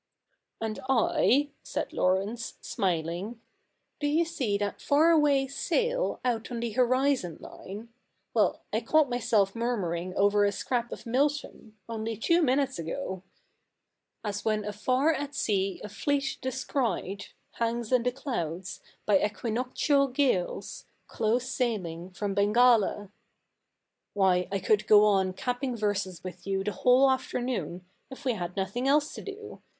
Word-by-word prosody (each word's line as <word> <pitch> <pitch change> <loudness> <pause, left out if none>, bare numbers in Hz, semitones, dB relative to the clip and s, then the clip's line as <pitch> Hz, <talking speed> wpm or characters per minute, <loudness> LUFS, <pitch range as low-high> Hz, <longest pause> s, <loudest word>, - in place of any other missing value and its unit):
'And 220 -1 -3
I 265 +3 +3
— - - -42
' - - -44
said - - -4
Laurence, 195 +6 0
smiling, 180 +5 -2 0.3
— - - -50
'do 290 - 0
you 320 +3 +2
see 255 -11 -1
that 205 0 -3
far 310 +4 +4
away 290 -4 +4
sail 485 - -1
out 235 -2 -1
on 240 -2 -4
the 235 -1 -2
horizon 255 - +1
line? 210 +5 -9 0.2
— - - -48
well, - - +2
I - - +1
caught 310 -4 +3
myself 220 -4 +2
murmuring 185 -7 -2
over 205 +1 +4
a 200 - +3
scrap 240 +2 -2
of - - -8
Milton, 260 -3 -1
only 225 -1 -4
two 335 +10 +3
minutes 270 - +1
ago 190 - -4 0.5
— - - -54
As 205 -1 -3
when 215 -1 0
afar 255 +9 +1
at 290 -1 -4
sea 195 -5 0
a - - -5
fleet 275 +5 -1
descried 235 -7 -2 0.2
Hangs 235 0 -2
in 255 -2 +4
the 250 +1 0
clouds, 190 - -4 0.2
by 200 -2 +4
equinoctial 250 +6 +1
gales 250 -9 -1 0.2
Close 235 +3 0
sailing 190 -10 -2
from 195 +2 -3
Bengala. 210 -1 +3 1.0
Why, 185 -2 +3
I 200 - +1
could 210 +2 +1
go 210 0 +7
on 190 -3 +2
capping 250 +4 -2
verses 200 -5 -2
with 185 0 -8
you 195 0 0
the 210 - -1
whole 255 +5 +4
afternoon, 245 -8 -2 0.2
if 270 +1 -11
we 255 - +2
had 180 -3 -5
nothing 200 +7 -1
else 295 +2 +3
to - - -7
do. 420 +1 -9
230 Hz, 150 wpm, -28 LUFS, 195-265 Hz, 1.0 s, go